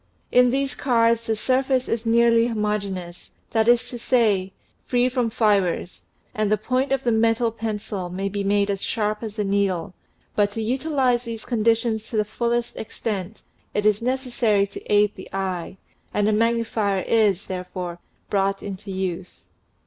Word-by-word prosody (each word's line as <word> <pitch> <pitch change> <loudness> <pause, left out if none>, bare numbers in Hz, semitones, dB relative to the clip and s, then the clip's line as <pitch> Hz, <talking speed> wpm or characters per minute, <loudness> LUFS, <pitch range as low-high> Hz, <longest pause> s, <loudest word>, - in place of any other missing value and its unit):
In 250 0 +6
these 270 +1 0
cards 230 -3 +2
the 220 - +1
surface 260 +3 +1
is 230 0 -2
nearly 230 0 +4
homo 210 -2 0
geneous, 180 -3 -7 0.2
that 220 -1 +2
is 240 +1 +4
to 240 - -6
say, 210 -7 +2 0.4
free 245 0 +2
from 250 -2 0
fibers, 200 -6 0 0.3
and 215 -1 0
the 215 - +4
point 255 +5 -1
of 270 -1 +1
the 240 - +2
metal 225 +1 +2
pencil 215 -4 -4
may 190 +2 -3
be 200 0 -2
made 200 0 +2
as 195 -1 -3
sharp 210 -1 -1
as 220 -1 -6
a 210 - +1
needle, 195 -3 0 0.4
but 205 -1 +2
to 225 - -3
utilize 255 0 +1
these 230 -2 -6
conditions 225 -1 +1
to 225 - -2
the 210 - +2
fullest 235 +2 -1
extent, 210 -2 -5 0.3
it 210 - 0
is 210 0 +3
necessary 245 -5 +1
to 200 - -10
aid 210 0 +4
the 190 - -11
eye, 190 -1 -3 0.4
and 205 0 +2
a 215 - +3
magnifier 225 -3 +1
is, 210 -4 +2
therefore, 180 -1 -5 0.3
brought 195 0 0
into 200 0 -7
use. 185 -1 -5
215 Hz, 165 wpm, -23 LUFS, 200-235 Hz, 0.4 s, In